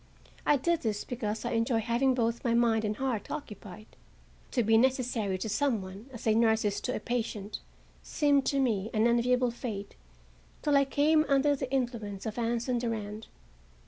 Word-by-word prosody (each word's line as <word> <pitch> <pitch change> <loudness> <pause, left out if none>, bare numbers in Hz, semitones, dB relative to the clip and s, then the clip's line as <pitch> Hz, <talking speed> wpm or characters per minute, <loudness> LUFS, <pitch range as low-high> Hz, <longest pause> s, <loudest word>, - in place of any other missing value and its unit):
I 295 - +5
did 340 +5 0
this 210 -3 -2
because 225 -2 -4
I 240 - -1
enjoy 230 0 +1
having 240 +4 +1
both 230 -1 0
my 235 -1 +2
mind 230 -2 +3
and 210 0 -1
heart 255 -6 -2
occupied. 215 -7 -8 0.6
To 245 - +1
be 225 +1 +3
necessary 240 -5 +1
to 185 - -4
some 230 +2 +1
one, 195 +6 -10
as 235 - -9
a 220 - +4
nurse 220 -1 +3
is 205 -1 -1
to 250 - -2
a - - -2
patient, 220 -4 -3 0.4
seemed 285 -2 +2
to 275 - +1
me 220 -6 0
an 215 +1 +3
enviable 245 +1 +2
fate 220 -4 -6 0.7
till 295 -1 +2
I 275 0 +5
came 305 +3 +3
under 280 +1 +3
the 265 -1 -5
influence 235 -7 -2
of 220 +1 -4
Anson 240 +1 0
Durand. 220 -2 -4
235 Hz, 175 wpm, -29 LUFS, 215-260 Hz, 0.7 s, I